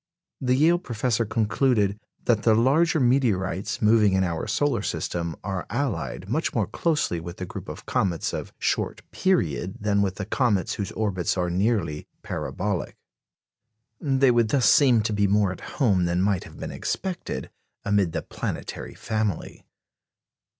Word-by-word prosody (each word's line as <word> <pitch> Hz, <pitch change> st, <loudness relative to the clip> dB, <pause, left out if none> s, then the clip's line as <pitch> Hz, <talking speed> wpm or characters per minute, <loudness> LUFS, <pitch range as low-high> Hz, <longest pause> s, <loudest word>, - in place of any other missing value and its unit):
The 125 Hz, -1 st, +2 dB
Yale 165 Hz, +5 st, +4 dB
Professor 120 Hz, -, -1 dB
concluded 105 Hz, -1 st, +1 dB, 0.3 s
"that 115 Hz, -3 st, +3 dB
the 110 Hz, -1 st, +4 dB
larger 155 Hz, +8 st, +3 dB
meteorites 110 Hz, -, +1 dB
moving 105 Hz, -2 st, +5 dB
in 95 Hz, 0 st, +3 dB
our 85 Hz, 0 st, -2 dB
solar 120 Hz, +2 st, +1 dB
system 85 Hz, -4 st, -3 dB
are 95 Hz, -2 st, -3 dB
allied 120 Hz, -6 st, -2 dB
much 145 Hz, +10 st, -1 dB
more -, -, +2 dB
closely 155 Hz, -, 0 dB
with 85 Hz, +2 st, -8 dB
the 90 Hz, -, -4 dB
group -, -, -8 dB
of -, -, -8 dB
comets 85 Hz, -4 st, 0 dB
of -, -, -4 dB
short -, -, -1 dB
period 95 Hz, -, 0 dB
than 105 Hz, -1 st, +1 dB
with 95 Hz, -2 st, 0 dB
the 105 Hz, -, -4 dB
comets 105 Hz, -, +1 dB
whose 100 Hz, -2 st, -4 dB
orbits 95 Hz, -5 st, -1 dB
are 90 Hz, -1 st, 0 dB
nearly 90 Hz, -5 st, 0 dB, 0.2 s
parabolic." 100 Hz, -2 st, -3 dB, 1.0 s
They 135 Hz, -2 st, +3 dB
would 120 Hz, -2 st, +3 dB
thus 130 Hz, -1 st, +2 dB
seem 120 Hz, -2 st, +5 dB
to 110 Hz, -, -1 dB
be 100 Hz, -1 st, +2 dB
more 100 Hz, -1 st, +3 dB
at 95 Hz, -, -8 dB, 0.2 s
home 100 Hz, -10 st, +3 dB
than 85 Hz, +1 st, 0 dB
might 100 Hz, -2 st, +1 dB
have -, -, -13 dB
been -, -, -5 dB
expected 185 Hz, -2 st, -4 dB, 0.3 s
amid 100 Hz, -4 st, +2 dB
the -, -, -3 dB
planetary -, -, -5 dB
family. 110 Hz, -5 st, -3 dB
105 Hz, 155 wpm, -25 LUFS, 95-125 Hz, 1.0 s, moving